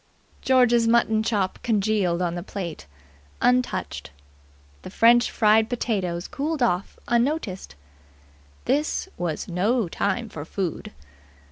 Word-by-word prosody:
George's 245 -3 +4
mutton 230 -2 +3
chop 205 -4 -1
congealed 200 -5 +1
on 170 -1 -1
the 175 - -4
plate, 175 - -7 0.5
untouched. 250 0 0 0.7
The - - -9
French 235 +5 +4
fried 220 0 +3
potatoes 190 -8 -2
cooled 295 -1 -2
off, 190 -5 -1
unnoticed. 235 - -1 0.9
This 295 +7 0
was 170 -3 -3
no 205 +5 0
time 205 +7 -2
for 160 -8 -8
food. 180 +1 -4
215 Hz, 110 wpm, -24 LUFS, 180-240 Hz, 0.9 s, George's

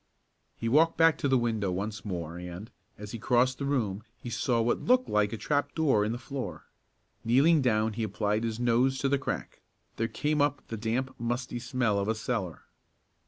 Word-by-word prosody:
He 115 - -4
walked 160 +7 +4
back 165 -2 +5
to 145 - 0
the 135 -1 +4
window 110 -5 0
once 100 +2 -4
more 85 -4 -4
and, 90 +6 -8 0.3
as 105 0 -8
he 115 - -6
crossed 125 +3 +2
the 140 - -2
room 110 -8 -1 0.2
he 120 - -8
saw 115 +1 +1
what 115 +1 +1
looked 255 +1 +3
like 105 -1 +2
a 115 - -4
trap 145 +6 -1
door 140 -10 +3
in 105 - -1
the 120 - -2
floor. 135 +1 -6 0.6
Kneeling 140 +7 +4
down 110 -3 +2
he 115 - -4
applied 105 +1 -1
his 115 0 -2
nose 125 +2 +2
to 135 +1 0
the 140 0 +2
crack. - - -5 0.4
There 115 - 0
came 150 +4 0
up 145 -1 0
the 115 - -3
damp, 120 +4 -2
musty 120 +1 -2
smell 120 -4 0
of 100 - -1
a 110 - +1
cellar. 110 -6 -3
120 Hz, 200 wpm, -29 LUFS, 105-135 Hz, 0.6 s, back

